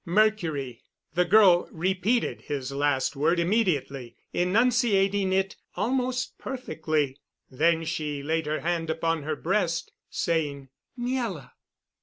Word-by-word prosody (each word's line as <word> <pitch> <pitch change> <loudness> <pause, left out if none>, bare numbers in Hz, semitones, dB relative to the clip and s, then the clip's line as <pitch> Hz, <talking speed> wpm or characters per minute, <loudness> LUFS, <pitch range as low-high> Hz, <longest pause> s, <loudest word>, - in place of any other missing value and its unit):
"Mercury." 170 - +1 0.3
The 180 +1 +2
girl 185 -2 +5
repeated 190 +8 0
his 140 -2 -4
last 140 0 0
word 160 +5 +2
immediately, 160 - 0 0.2
enunciating 200 -1 +2
it 190 +1 0 0.2
almost 255 +1 -1
perfectly. 155 - -2 0.3
Then 165 +4 +2
she 150 -3 -3
laid 160 +1 -1
her 155 +1 -1
hand 170 -1 -1
upon 165 0 0
her 155 +1 -2
breast, 170 -1 -1 0.2
saying: 145 -5 -1 0.3
"Miela." 240 - -3
170 Hz, 110 wpm, -27 LUFS, 150-205 Hz, 0.3 s, girl